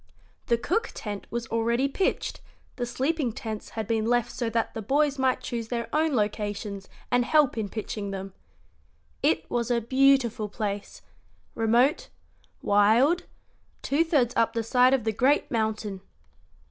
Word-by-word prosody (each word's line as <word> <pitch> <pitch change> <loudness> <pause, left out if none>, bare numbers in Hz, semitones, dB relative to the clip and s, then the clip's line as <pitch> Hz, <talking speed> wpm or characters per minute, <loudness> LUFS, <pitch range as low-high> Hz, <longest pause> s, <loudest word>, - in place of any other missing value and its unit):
The 235 - +3
cook 365 - -1
tent 205 -2 -6
was 235 0 -3
already 235 +3 +1
pitched; 370 +7 -1 0.3
the 245 -1 -3
sleeping 270 +2 -1
tents 215 -1 -6
had 220 - -1
been 225 -1 0
left 240 0 +1
so 235 -2 -2
that 225 0 -1
the 225 - -5
boys 280 +5 +1
might 260 -1 +1
choose 230 -2 -4
their 235 0 -3
own 310 -2 +2
locations 205 -2 -2 0.2
and 245 0 +3
help 295 +1 +3
in 215 -3 -3
pitching 210 -1 -5
them. 195 -1 -6 0.9
It 160 0 +2
was 235 -1 -1
a 240 -1 +2
beautiful 250 -3 +2
place 205 0 -5 0.5
remote, 235 +7 +2 0.6
wild, 225 - +4 0.6
two 290 +4 +2
thirds 280 -8 +1
up 230 - +2
the 230 -1 -1
side 250 +3 +4
of 255 - -3
the 220 0 0
great 265 +7 +2
mountain. 215 -3 -2
235 Hz, 150 wpm, -26 LUFS, 215-265 Hz, 0.9 s, wild